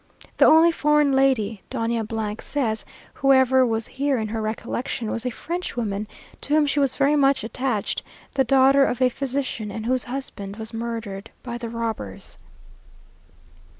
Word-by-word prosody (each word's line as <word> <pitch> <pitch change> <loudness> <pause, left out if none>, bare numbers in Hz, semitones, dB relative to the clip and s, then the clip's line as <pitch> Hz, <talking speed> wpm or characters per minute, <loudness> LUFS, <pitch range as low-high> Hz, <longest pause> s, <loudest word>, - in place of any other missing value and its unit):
The - - +6
only 325 +2 +7
foreign 300 -2 +3
lady, 250 -7 +2
Doña 225 -2 -2
says, 230 -7 -1 0.3
whoever 260 -1 +4
was 225 -2 0
here 275 0 -1
in 220 -2 -2
her 220 0 -3
recollection, 225 +1 -3
was 235 +2 -2
a - - +1
Frenchwoman, 240 - -4 0.3
to 295 - 0
whom 305 -1 +4
she 285 0 0
was 275 -2 +2
very 285 +1 +3
much 275 -4 +3
attached, 235 -2 -2 0.3
the 270 - +3
daughter 270 +2 +5
of 250 - 0
a 255 -1 +4
physician, 260 -4 -3
and 220 +2 -6
whose 255 +1 0
husband 235 -6 -6
was 220 +1 -8
murdered 225 -3 -5
by 240 -1 -5
the 235 -1 -5
robbers. 225 - -5
245 Hz, 150 wpm, -23 LUFS, 220-275 Hz, 0.3 s, only